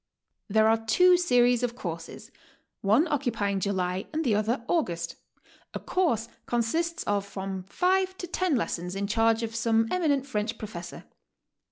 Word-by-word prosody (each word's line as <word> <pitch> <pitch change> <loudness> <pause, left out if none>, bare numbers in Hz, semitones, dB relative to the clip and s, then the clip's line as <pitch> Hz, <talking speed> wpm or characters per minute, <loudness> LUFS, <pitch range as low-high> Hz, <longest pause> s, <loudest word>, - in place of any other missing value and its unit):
There 220 +1 +3
are 225 0 +2
two 360 +12 +5
series 245 -8 +3
of 240 -1 -1
courses, 165 -7 -7 0.5
one 220 - +3
occupying 230 -9 -1
July 185 -1 -1
and 315 +1 -1
the 235 - +3
other 225 +4 0
August. 170 - -1 0.6
A - - -2
course 270 - 0 0.2
consists 320 +9 -1
of 205 -1 0
from 195 -1 -5
five 375 - +1
to - - -5
ten 355 -2 0
lessons 180 -5 -2
in 200 +1 -1
charge 225 +2 +2
of 225 0 -4
some 225 0 +2
eminent 295 -7 +1
French 220 -3 -2
professor. 175 -5 -8
225 Hz, 150 wpm, -27 LUFS, 200-285 Hz, 0.6 s, two